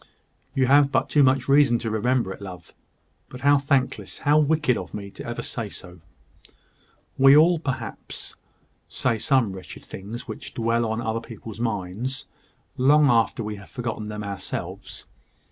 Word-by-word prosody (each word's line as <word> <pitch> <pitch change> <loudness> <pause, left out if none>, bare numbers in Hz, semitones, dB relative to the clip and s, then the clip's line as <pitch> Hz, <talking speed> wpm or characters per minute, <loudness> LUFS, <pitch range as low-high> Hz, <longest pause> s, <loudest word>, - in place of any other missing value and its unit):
"You 135 -1 +3
have 140 +2 +5
but 130 - +1
too 150 - +4
much 130 -1 +3
reason 140 -3 +5
to 115 -1 -4
remember 115 -2 0
it, - - -14
love. 90 -3 -10 0.6
But 125 - -10
how 145 0 +5
thankless, 135 -2 -1
how 150 +2 +3
wicked 150 -4 +2
of 90 -1 -6
me 100 -1 -7
ever 120 - -5
to - - -5
say 115 -4 -4
so." 90 -2 -11 1.2
"We 135 +2 +8
all, 165 +2 +5
perhaps, 135 -5 -5 0.5
say 115 - -1
some 120 -5 +2
wretched 95 -1 -10
things 110 +6 -8
which 110 - -8
dwell 115 0 +1
on 110 +1 -2
other 115 0 -2
people's 115 -1 -10
minds, 115 +3 -3 0.5
long 145 +2 +5
after 115 0 +2
we 105 -1 -5
have 100 - -13
forgotten 115 -4 -4
them 105 0 -5
ourselves. 100 -1 -6
120 Hz, 160 wpm, -24 LUFS, 105-135 Hz, 1.2 s, We